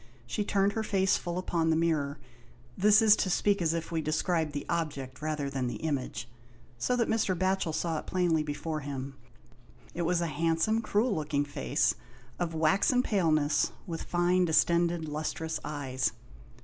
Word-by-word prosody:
She 125 - -2
turned 200 -1 +2
her 220 - -1
face 195 -3 +2
full 175 0 -3
upon 170 -3 0
the 160 - +3
mirror 155 -3 0 0.3
— 120 0 -26
this 210 +5 +5
is 215 -1 +7
to 190 - 0
speak 200 +1 +2
as 165 -1 +1
if 165 0 -4
we 165 -1 0
described 160 +1 0
the 145 0 -5
object 140 -6 -3
rather 155 -2 -2
than 135 -2 -2
the 120 - -3
image 135 -6 -2 0.3
— 120 - -27
so 250 - +1
that 235 -2 +1
Mr. 210 -5 +1
Batchel 185 -2 0
saw 160 0 -1
it - - -11
plainly 175 -4 +1
before 150 +1 -3
him; 140 -1 -5 0.8
it 175 - -3
was 170 +1 +1
a 170 - 0
handsome, 165 +8 +1
cruel 220 +1 +1
looking 150 -3 -1
face, 65 - 0 0.5
of 170 -2 -2
waxen 195 - +3
paleness, 155 - +2
with 165 -3 -5
fine, 175 +1 +2
distended, 170 0 +2
lustrous, 155 +2 -3
eyes. 135 -3 -2
165 Hz, 175 wpm, -29 LUFS, 150-185 Hz, 0.8 s, is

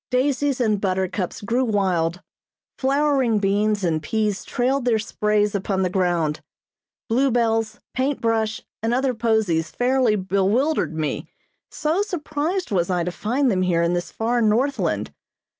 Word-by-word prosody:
Daisies 275 +1 +1
and 215 -4 +1
buttercups 185 -1 -2
grew 235 +5 0
wild. 185 -6 0 0.6
Flowering 270 -4 +2
beans 205 +1 +1
and 160 -3 +1
peas 210 +4 -1
trailed 260 +2 0
their 240 -2 +2
sprays 210 -1 0
upon 195 -1 -1
the 180 - 0
ground. 175 -5 0 0.7
Blue 260 +5 +2
bells, 225 -2 0
paint 265 +2 0
brush, 225 -1 0 0.2
and 225 +2 +1
other 260 0 +1
posies 220 -8 +1
fairly 250 -1 +2
bewildered 195 - +1
me, 155 -1 -2 0.4
so 315 +5 0
surprised 340 - -2
was 175 -3 +1
I 180 -2 +1
to 180 - -2
find 250 +8 0
them 185 -2 +1
here 175 -2 +2
in 170 +1 +1
this 175 0 -3
far 235 +2 0
Northland. 235 +6 +1
220 Hz, 140 wpm, -22 LUFS, 190-255 Hz, 0.7 s, Flowering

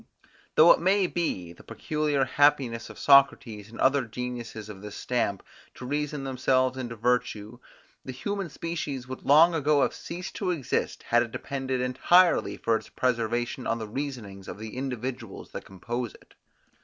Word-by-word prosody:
Though 165 +2 +8
it - - +5
may 190 +3 +3
be 95 - -2
the - - -17
peculiar 150 -3 -1
happiness 130 -6 +2
of - - -11
Socrates 135 -6 +4
and 115 - -12
other 135 0 +3
geniuses 120 -2 -6
of 100 -3 -10
his 105 -1 -8
stamp, 115 -6 -1 0.3
to 125 - -9
reason 145 +1 -2
themselves 130 -1 +1
into 120 -3 -5
virtue, 120 -1 -1 0.4
the 130 - -6
human 195 +7 -4
species 145 -5 -4
would 130 0 -7
long 160 +5 +6
ago 150 -2 +3
have - - 0
ceased 180 +2 -7
to 195 - -1
exist, 160 -8 -2
had 120 0 +3
it 120 -1 -3
depended 130 -1 -3
entirely 170 +8 +3
for 115 - +1
its - - -5
preservation 120 +1 -1
on 115 - 0
the 110 -2 -5
reasonings 110 -6 -6
of - - -7
the 110 +1 -8
individuals 125 -4 -5
that - - -7
compose 120 +5 -5
it. - - -20
130 Hz, 165 wpm, -27 LUFS, 115-145 Hz, 0.4 s, Though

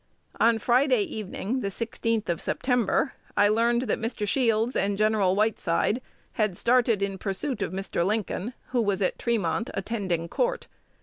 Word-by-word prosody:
On 230 0 +4
Friday 250 0 +3
evening, 215 +4 -4
the 200 - -2
16th 230 +1 -2
of 170 -1 -1
September, 250 +2 0 0.2
I 205 - +5
learned 235 +3 +2
that 230 - -1
Mr. 225 -2 -3
Shields 230 0 +2
and 200 0 0
Gen. 215 +1 +3
Whiteside 205 +2 +1 0.3
had 210 -6 0
started 235 -4 +3
in 195 -1 -2
pursuit 220 +9 -3
of - - -1
Mr. 190 -2 -2
Lincoln, 215 +3 -1 0.2
who 250 -2 +1
was 200 -2 0
at 185 - -1
Tremont, 225 -2 0
attending 190 -5 -2
court. - - -1
220 Hz, 150 wpm, -26 LUFS, 195-235 Hz, 0.3 s, I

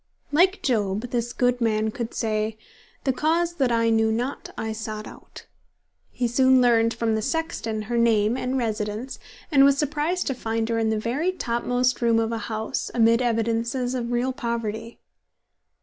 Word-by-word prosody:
Like 365 +6 +3
Job 215 -1 0
this 240 -1 -1
good 245 0 +1
man 220 -1 +1
could 235 +1 -5
say, 215 -1 -1 0.5
"The 265 - +1
cause 330 +5 +1
that 260 -4 +2
I 230 0 +2
knew 220 0 +3
not, 245 +5 -3
I 220 - -3
sought 215 -1 -5
out." - - -12 0.6
He 245 - -1
soon 260 +2 +4
learned 230 -2 +3
from 230 -1 0
the 220 - 0
sexton 230 -8 -2
her 235 +2 -1
name 225 -1 +3
and 255 +1 -2
residence, 220 +1 -3 0.3
and 275 -2 +6
was 280 0 +5
surprised 300 +5 -1
to 270 - 0
find 225 -2 -2
her 230 -1 0
in 220 -1 +1
the 220 - 0
very 260 +11 -1
topmost 245 -4 -1
room 230 -1 +3
of 225 0 0
a 230 - -2
house, 220 +1 -3
amid 230 0 +4
evidences 235 +2 0
of 245 -2 -3
real 245 +2 0
poverty. 230 -1 -4
235 Hz, 170 wpm, -24 LUFS, 225-255 Hz, 0.6 s, and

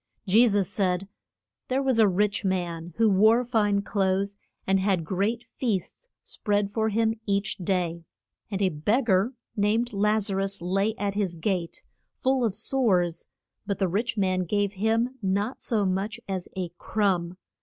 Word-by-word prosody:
Je 220 +5 +5
sus 200 -4 +1
said, 190 -2 0 0.6
There 265 +2 0
was 260 -4 +2
a 220 - +7
rich 205 +3 +1
man, 175 -3 -2
who 225 - +4
wore 220 +5 +4
fine 210 -4 +1
clothes, 195 0 0 0.3
and 195 0 +2
had 190 -4 +1
great 200 +7 -1
feasts 240 - -2
spread 205 -1 -1
for 220 +1 0
him 225 +1 +1
each 200 +1 0
day. 175 -2 -1 0.5
And 200 -1 -1
a 190 - +4
beg 205 - 0
gar 200 +4 +2 0.2
named 220 +3 +1
Laz 210 0 +1
a - - -1
rus 195 0 0
lay 195 +5 0
at 205 -4 -2
his 195 -4 -1
gate, 170 0 -2 0.3
full 260 -1 +1
of 215 -4 0
sores; 205 -8 +1 0.4
but 200 -2 -1
the 190 - +1
rich 220 +6 -1
man 185 -2 +1
gave 205 +2 0
him 225 +6 0
not 200 +5 -1
so 215 -5 0
much 195 +4 -1
as 190 -2 -4
a 180 -2 -2
crumb. 185 -4 0
200 Hz, 165 wpm, -26 LUFS, 190-220 Hz, 0.6 s, a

